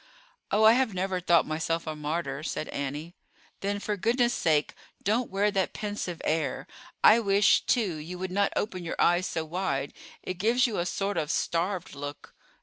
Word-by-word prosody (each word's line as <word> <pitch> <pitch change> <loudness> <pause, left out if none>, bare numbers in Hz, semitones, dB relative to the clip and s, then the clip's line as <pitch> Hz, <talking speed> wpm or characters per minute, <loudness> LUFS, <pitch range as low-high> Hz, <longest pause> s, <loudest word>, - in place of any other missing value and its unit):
"Oh, 215 - +2
I 220 +1 +8
have 245 -5 +1
never 185 0 -1
thought 170 -2 +4
myself 160 +1 -2
a 155 -1 -4
martyr," 150 -2 -3
said 155 0 -3
Annie. 145 +4 -4 0.5
"Then, 205 +1 -2
for 210 +1 -2
goodness' 240 +4 +2
sake, 150 -2 +1 0.3
don't 225 +5 +1
wear 200 +2 +1
that 195 -2 0
pensive 205 -5 -4
air. 160 +1 -1 0.4
I 220 - +8
wish, 200 -2 +4
too, 205 -10 +1
you 165 +4 -7
would 185 0 -4
not 200 +1 +1
open 185 -4 -2
your 170 - -5
eyes 175 +2 +3
so 160 -1 -3
wide. 155 -5 -2 0.3
It 185 -1 -5
gives 235 +6 +3
you 230 -7 -1
a 175 - -1
sort 195 0 -2
of 155 -2 -1
starved 175 +2 -1
look." 145 +1 -8
180 Hz, 180 wpm, -28 LUFS, 160-205 Hz, 0.5 s, I